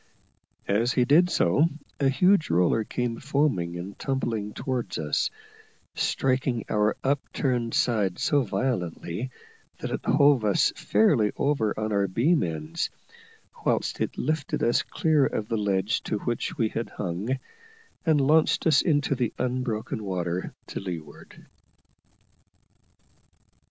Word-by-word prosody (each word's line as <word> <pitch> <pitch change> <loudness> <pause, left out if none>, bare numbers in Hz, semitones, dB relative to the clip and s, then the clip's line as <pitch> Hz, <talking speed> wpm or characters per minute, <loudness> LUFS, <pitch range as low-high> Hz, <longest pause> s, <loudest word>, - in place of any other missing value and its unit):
As 115 +5 +2
he 125 - +3
did 165 +7 +5
so, 145 - +3 0.3
a 135 -1 +3
huge 180 +5 +3
roller 90 +6 +3
came 120 +1 -3
foaming 135 - 0
and 95 +3 -8
tumbling 115 -6 -2
towards 120 -7 -3
us, 75 -2 0 0.6
striking 130 -3 0
our 105 0 +1
upturned 130 -3 -1
side 105 -7 +1
so 145 -1 +2
violently 100 -2 -2 0.5
that - - -5
it - - -3
hove 140 -4 +4
us 105 -2 +3
fairly 110 0 +3
over 140 -8 0
on 110 0 -2
our 100 -1 +2
beam 140 - +2
ends, 80 -2 -3 0.7
whilst - - 0
it - - -2
lifted 155 0 -1
us 120 +1 +3
clear 155 -3 +1
of 110 -5 -1
the 115 - 0
ledge 100 +2 0
to 105 - -2
which 120 +3 -3
we 110 -2 +1
had 115 - -4
hung, 100 +7 -3 0.7
and 160 -5 +3
launched 155 +3 +3
us 160 - +5
into 145 -4 +1
the 125 -4 -1
unbroken 125 -4 -2
water 90 -2 -2
to - - -6
leeward. 80 -6 -8
115 Hz, 130 wpm, -26 LUFS, 100-135 Hz, 0.7 s, did